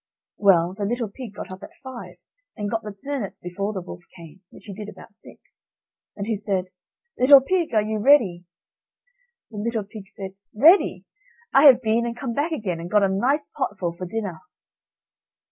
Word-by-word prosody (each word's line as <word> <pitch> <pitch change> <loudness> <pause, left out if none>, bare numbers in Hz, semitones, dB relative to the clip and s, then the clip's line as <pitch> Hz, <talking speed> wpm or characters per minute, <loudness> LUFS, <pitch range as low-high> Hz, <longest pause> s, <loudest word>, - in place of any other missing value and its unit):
Well, 180 -3 +4
the 205 0 -3
little 230 0 -2
pig 230 -3 -9
got - - -8
up 185 +1 -9
at - - -12
five, 260 -2 -9 0.4
and 205 -2 -3
got 225 -1 -1
the 210 - -7
turnips 220 +1 -5
before 195 +4 -4
the 190 -4 -5
wolf 175 - -9
came 170 +1 -13
(which - - -16
he 205 - -8
did 210 +1 -8
about 210 +2 -14
six) 210 - -13 0.5
and 200 - -4
who 225 0 -1
said: 195 -3 -1 0.5
"Little 275 +2 +9
Pig, 340 +5 -1
are 215 - +4
you 215 0 -2
ready?" 205 -9 +4 1.1
The 215 - -9
little 225 0 -2
pig 200 0 -11
said: 195 -1 -7 0.2
"Ready! 325 - +5 0.5
I 275 +2 +6
have 255 -3 +8
been 230 +2 +1
and 235 0 -5
come 250 -2 -4
back 290 +6 -1
again, 200 - -3
and 170 +1 -7
got 210 0 +3
a 195 - +3
nice 265 +10 0
potful 180 -5 -3
for 180 +1 -6
dinner." 195 -4 -4
210 Hz, 185 wpm, -23 LUFS, 190-240 Hz, 1.1 s, Little